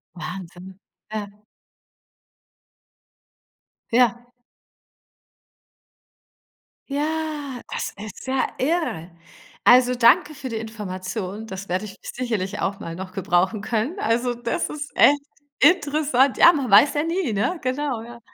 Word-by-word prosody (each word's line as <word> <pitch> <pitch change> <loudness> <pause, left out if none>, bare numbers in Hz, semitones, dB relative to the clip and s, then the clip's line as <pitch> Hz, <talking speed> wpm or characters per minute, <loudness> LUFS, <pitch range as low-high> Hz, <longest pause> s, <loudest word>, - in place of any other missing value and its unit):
Wahnsinn. 180 +1 -8 0.3
Ja. 210 -2 -3 2.6
Ja. 240 0 +3 2.6
Ja, 295 -3 -3
das - - -3
ist 215 +5 -10
ja 260 0 +1
irre. 270 - -1 0.5
Also, 250 0 +6
danke 245 +5 +4
für 260 -2 -6
die 225 - -3
Information. 210 -1 -5
Das 195 -1 -7
werde 185 +4 -1
ich 200 - -9
sicherlich 210 -5 -3
auch 195 +1 -2
mal 165 0 -6
noch 185 0 -8
gebrauchen 190 +3 +1
können. 225 - -2
Also, 240 +2 +1
das 235 0 -2
ist 295 -1 -6
echt 285 0 +5 0.4
interessant. 290 -4 +3
Ja, 340 - +8
man 280 -7 -2
weiß 215 +10 +6
ja 295 - +1
nie, 330 -5 -1
ne? 215 - 0
Genau, 260 -2 -2
ja. 235 +1 -11
240 Hz, 115 wpm, -23 LUFS, 200-285 Hz, 2.6 s, Ja